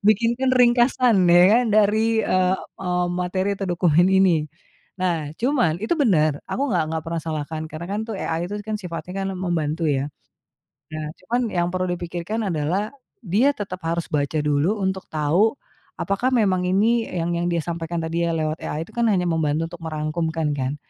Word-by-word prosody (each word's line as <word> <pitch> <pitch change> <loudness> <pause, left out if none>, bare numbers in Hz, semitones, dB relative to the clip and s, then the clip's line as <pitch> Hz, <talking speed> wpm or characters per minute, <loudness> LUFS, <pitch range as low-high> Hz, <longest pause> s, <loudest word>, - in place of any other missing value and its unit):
Bikinkan 235 +4 +2
ringkasan 240 -4 +4
ya 175 +1 +7
kan, 250 - +1
dari 215 +2 +3
eee 185 0 +2
eee, 180 -1 -3
materi 185 +2 -1
atau 195 -2 -4
dokumen 175 +1 +3
ini. 175 -6 +3 0.5
Nah, 165 -5 -1
cuman 240 - +1
itu 220 - 0
benar, 155 - +2
aku 270 - -1
enggak 165 -3 +2
enggak 160 -1 -2
pernah 165 -1 -3
salahkan 155 0 -4
karena 160 +2 -6
kan 200 +3 -2
tuh 225 - -3
AI 170 +1 -2
itu 205 - -3
kan 215 - -2
sifatnya 180 0 -6
kan - - -2
membantu 165 -3 -1
ya. 145 -1 0 0.8
Nah, 155 0 -5 0.2
cuman 235 +7 -1
yang 175 -1 +1
perlu 185 +1 -1
dipikirkan 175 +5 -3
adalah 175 +6 -1 0.4
dia 215 +10 +3
tetap 190 -3 -5
harus 170 0 -1
baca 145 +1 0
dulu 150 +8 +1
untuk 190 0 -2
tahu 165 - +2 0.4
apakah 200 +6 0
memang 185 -5 +2
ini 225 +5 +2
yang 175 -1 -2
yang 170 0 -1
dia 170 -1 0
sampaikan 170 0 -4
tadi 165 +1 -2
ya 165 - 0
lewat 155 0 -2
AI 155 +2 -3
itu - - -18
kan 235 -1 +1
hanya 190 -4 +2
membantu 160 -1 0
untuk 175 - -10
merangkumkan 155 0 -2
kan, 135 +2 -2
175 Hz, 175 wpm, -23 LUFS, 160-205 Hz, 0.8 s, ya